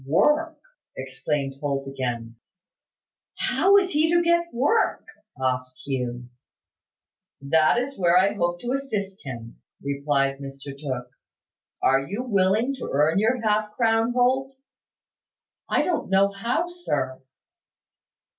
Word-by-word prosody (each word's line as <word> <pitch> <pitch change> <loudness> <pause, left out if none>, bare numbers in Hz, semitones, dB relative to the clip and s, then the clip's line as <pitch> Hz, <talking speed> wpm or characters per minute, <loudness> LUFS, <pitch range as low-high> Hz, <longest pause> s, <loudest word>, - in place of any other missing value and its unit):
"Work!" 300 - +2 0.4
exclaimed 135 +1 -3
Holt 140 -1 -2
again. 120 -4 -4 1.0
"How 395 +2 +4
is 375 -2 +2
he 315 +2 +2
to 345 0 +4
get 340 0 +2
work?" 285 - +1 0.3
asked 130 -1 -2
Hugh. 125 -3 -3 1.1
"That 155 +7 +3
is 255 +1 -3
where 175 -1 +4
I 195 +2 +4
hope 175 -3 -1
to 240 - -3
assist 215 -8 -3
him," 115 -4 -8 0.2
replied 140 -1 0
Mr 135 0 -8
Tooke. 130 -4 -5 0.7
"Are 135 +1 +5
you 200 - -4
willing 215 +3 +2
to - - -5
earn 150 +6 +3
your 230 +3 +1
half 210 0 +1
crown, 225 0 +2
Holt?" 260 +2 +1 1.1
"I - - +2
don't 320 - -1
know 195 +1 +4
how, 235 - -1
sir." 145 - -3
185 Hz, 120 wpm, -24 LUFS, -, 1.1 s, Are